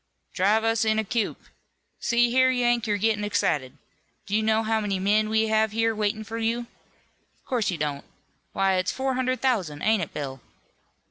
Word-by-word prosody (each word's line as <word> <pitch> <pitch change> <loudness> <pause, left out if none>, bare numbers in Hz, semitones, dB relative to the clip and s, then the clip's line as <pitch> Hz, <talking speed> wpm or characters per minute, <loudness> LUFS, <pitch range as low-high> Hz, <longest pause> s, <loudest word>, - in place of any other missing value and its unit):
"Drive 205 +4 +2
us 225 0 +2
in 220 0 +1
a 220 - +1
coop. 220 0 -2 0.6
See 240 -1 +2
here, 260 +1 +4
Yank, 240 -2 +1
you're 205 -1 +1
gettin' 210 0 +1
excited. 145 -9 -1 0.5
Do 200 - -2
you 220 - +3
know 220 +1 +2
how 220 0 +1
many 200 -2 -1
men 210 +3 +2
we 220 0 +1
have 220 -1 +2
here 225 0 +1
waitin' 215 0 -1
for 225 +2 -6
you? 230 +1 0 0.8
Of - - -38
course 240 -5 0
you 180 - -2
don't. 145 -2 -3 0.5
Why, 195 -1 +1
it's 185 0 0
four 265 0 -2
hundred 255 0 -1
thousand, 185 - 0
ain't 220 -2 +3
it, 160 - -4
Bill?" 135 -3 -6
220 Hz, 190 wpm, -25 LUFS, 195-230 Hz, 0.8 s, here